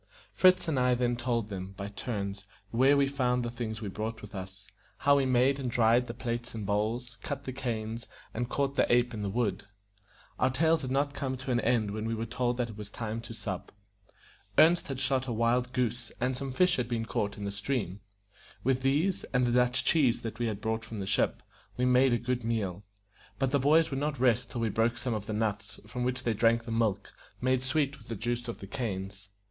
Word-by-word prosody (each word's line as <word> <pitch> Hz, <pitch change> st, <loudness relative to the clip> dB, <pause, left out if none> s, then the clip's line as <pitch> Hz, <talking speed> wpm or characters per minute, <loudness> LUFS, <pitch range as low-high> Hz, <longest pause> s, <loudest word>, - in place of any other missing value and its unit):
Fritz 185 Hz, -1 st, +5 dB
and 150 Hz, -5 st, +1 dB
I 125 Hz, 0 st, +3 dB
then 120 Hz, 0 st, +1 dB
told 120 Hz, -3 st, -1 dB
them, 95 Hz, -1 st, -6 dB
by 100 Hz, -, -4 dB
turns, 100 Hz, -2 st, -4 dB, 0.2 s
where 135 Hz, +5 st, +5 dB
we 140 Hz, -, +4 dB
found 125 Hz, -3 st, 0 dB
the 120 Hz, -, -3 dB
things 115 Hz, -2 st, -4 dB
we -, -, -3 dB
brought 110 Hz, +3 st, -4 dB
with 105 Hz, 0 st, -10 dB
us, 95 Hz, 0 st, -7 dB, 0.3 s
how 140 Hz, 0 st, +4 dB
we 135 Hz, -1 st, +2 dB
made 130 Hz, +2 st, +3 dB
and 130 Hz, -2 st, -2 dB
dried 120 Hz, +1 st, +3 dB
the 115 Hz, -, -6 dB
plates 120 Hz, 0 st, -4 dB
and 110 Hz, -2 st, -4 dB
bowls, 110 Hz, +5 st, -1 dB
cut 140 Hz, 0 st, -4 dB
the 130 Hz, -, -5 dB
canes, 115 Hz, -3 st, -3 dB, 0.3 s
and 120 Hz, +1 st, -2 dB
caught 140 Hz, 0 st, 0 dB
the -, -, +2 dB
ape 120 Hz, 0 st, +3 dB
in 105 Hz, -, -4 dB
the 100 Hz, -, -1 dB
wood. 100 Hz, -3 st, -1 dB, 0.7 s
Our 130 Hz, -, +4 dB
tales 160 Hz, +4 st, +2 dB
had 130 Hz, -, -4 dB
not 140 Hz, +2 st, +1 dB
come 130 Hz, -2 st, -3 dB
to 130 Hz, 0 st, -4 dB
an 120 Hz, -, +3 dB
end 115 Hz, -4 st, +1 dB
when 110 Hz, +1 st, -3 dB
we 115 Hz, -, -1 dB
were 115 Hz, +1 st, -3 dB
told 120 Hz, +1 st, -1 dB
that 120 Hz, -2 st, -1 dB
it 105 Hz, -, -11 dB
was 105 Hz, -1 st, -7 dB
time 110 Hz, +1 st, -4 dB
to 115 Hz, 0 st, -9 dB
sup. 95 Hz, -5 st, -5 dB, 0.9 s
Ernest 170 Hz, +2 st, +6 dB
had 135 Hz, -2 st, -4 dB
shot 130 Hz, 0 st, +1 dB
a -, -, -2 dB
wild 120 Hz, +2 st, +1 dB
goose, 120 Hz, -2 st, -1 dB
and 125 Hz, +1 st, 0 dB
some 135 Hz, +1 st, -4 dB
fish 180 Hz, +6 st, +3 dB
had 125 Hz, -, -1 dB
been 115 Hz, -2 st, -1 dB
caught 100 Hz, -2 st, -2 dB
in 100 Hz, -, -5 dB
the 100 Hz, -, -2 dB
stream. 100 Hz, -2 st, -2 dB, 0.6 s
With 130 Hz, 0 st, +2 dB
these, 150 Hz, +8 st, +1 dB
and 125 Hz, -1 st, +1 dB
the 120 Hz, -, +1 dB
Dutch 125 Hz, +1 st, +3 dB
cheese 135 Hz, -7 st, +3 dB
that 115 Hz, 0 st, -5 dB
we 120 Hz, -2 st, +1 dB
brought 110 Hz, +2 st, -2 dB
from 110 Hz, -1 st, -7 dB
the 95 Hz, -, -3 dB
ship, 100 Hz, +1 st, +1 dB, 0.3 s
we 125 Hz, -, +2 dB
made 125 Hz, +1 st, +5 dB
a 120 Hz, -, +3 dB
good 125 Hz, 0 st, -2 dB
meal; 105 Hz, -5 st, -2 dB, 0.5 s
but 135 Hz, -1 st, 0 dB
the 140 Hz, -, +3 dB
boys 155 Hz, +4 st, +4 dB
would 135 Hz, -, -1 dB
not 145 Hz, -2 st, -2 dB
rest 120 Hz, -3 st, +3 dB
till 120 Hz, -, -4 dB
we 115 Hz, -, +1 dB
broke 115 Hz, +3 st, +1 dB
some 125 Hz, 0 st, -2 dB
of 105 Hz, -1 st, -4 dB
the 110 Hz, -, -2 dB
nuts, 105 Hz, -1 st, -2 dB
from 125 Hz, +4 st, -4 dB
which 125 Hz, +1 st, -1 dB
they 115 Hz, -, +1 dB
drank 115 Hz, +2 st, +3 dB
the 115 Hz, -, -5 dB
milk, 110 Hz, -3 st, 0 dB, 0.3 s
made 130 Hz, 0 st, +2 dB
sweet 140 Hz, +1 st, 0 dB
with 110 Hz, -, -17 dB
the 115 Hz, -, -4 dB
juice 120 Hz, +3 st, -2 dB
of 115 Hz, -, -4 dB
the -, -, -6 dB
canes. 100 Hz, -4 st, -4 dB
120 Hz, 230 wpm, -30 LUFS, 110-130 Hz, 0.9 s, Ernest